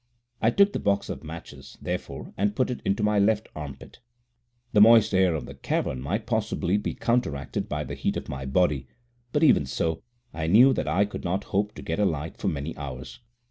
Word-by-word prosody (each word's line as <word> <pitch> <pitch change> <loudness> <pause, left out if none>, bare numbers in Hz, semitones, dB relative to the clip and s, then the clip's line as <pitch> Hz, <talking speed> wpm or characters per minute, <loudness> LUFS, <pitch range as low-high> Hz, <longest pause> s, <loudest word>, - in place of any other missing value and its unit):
I 110 - +4
took 200 +11 +4
the - - -1
box 100 0 0
of - - -5
matches, 80 +1 -10
therefore, - - -5
and 105 +1 0
put 130 0 +1
it 125 - -5
into 100 +2 0
my 105 0 +3
left 105 +1 +2
armpit. 70 -3 -9 0.7
The 105 - +6
moist 110 -1 +7
air 95 -3 +3
of 75 - -4
the - - -9
cavern 65 - -2
might 100 - -2
possibly 105 -4 0
be 105 - -3
counteracted 115 - -1
by 75 0 -2
the - - -6
heat - - -1
of - - -6
my 65 0 -5
body, 70 -3 +1 0.4
but 150 +4 +1
even 70 - +5
so, 80 +4 -1 0.3
I 80 -1 -3
knew 120 +10 +7
that - - -2
I 90 +7 +3
could 105 - -7
not 95 +3 -1
hope 105 +1 0
to - - -9
get 80 - -3
a 105 - +3
light 80 -2 -2
for - - -3
many 75 +2 -3
hours. 70 -3 -7
95 Hz, 210 wpm, -26 LUFS, 75-105 Hz, 0.7 s, moist